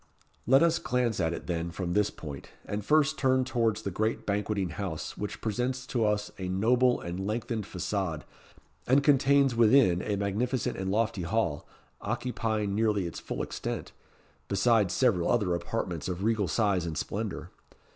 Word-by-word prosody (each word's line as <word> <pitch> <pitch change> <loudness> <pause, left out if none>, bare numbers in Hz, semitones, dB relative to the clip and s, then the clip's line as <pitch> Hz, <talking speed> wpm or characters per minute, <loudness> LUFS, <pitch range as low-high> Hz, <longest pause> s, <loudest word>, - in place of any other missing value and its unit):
Let 135 +5 +6
us 170 0 +3
glance 125 -4 0
at 80 -2 +1
it, - - -5
then, 85 -1 -2
from 85 +1 -3
this 105 +1 +2
point, 70 -4 -9 0.2
and 105 0 -3
first 155 +3 +3
turn 130 -1 +3
towards 115 -4 0
the 100 - -3
great 110 +5 -1
Banqueting 100 -2 -1
House, - - -5
which 105 - -5
presents 125 +3 -2
to 120 -3 -1
us 105 0 0
a 90 -1 -3
noble 120 +6 +3
and 85 +2 -5
lengthened 110 -1 -2
façade, 90 -4 -3 0.6
and 135 +3 +4
contains 140 -1 +4
within 115 -6 +5
a 105 - -1
magnificent 110 +5 -1
and 95 0 -3
lofty 105 -1 0
hall, 85 -4 -1 0.3
occupying 110 -3 -2
nearly 105 -3 +1
its 85 - -5
full - - -4
extent, - - -5 0.6
besides 100 -1 +3
several 105 -10 +2
other 105 -7 +2
apartments 85 -2 -3
of 90 +1 -3
regal 110 -3 +1
size 95 -2 +1
and 80 - -4
splendour. 105 -2 -4
105 Hz, 160 wpm, -29 LUFS, 95-120 Hz, 0.6 s, Let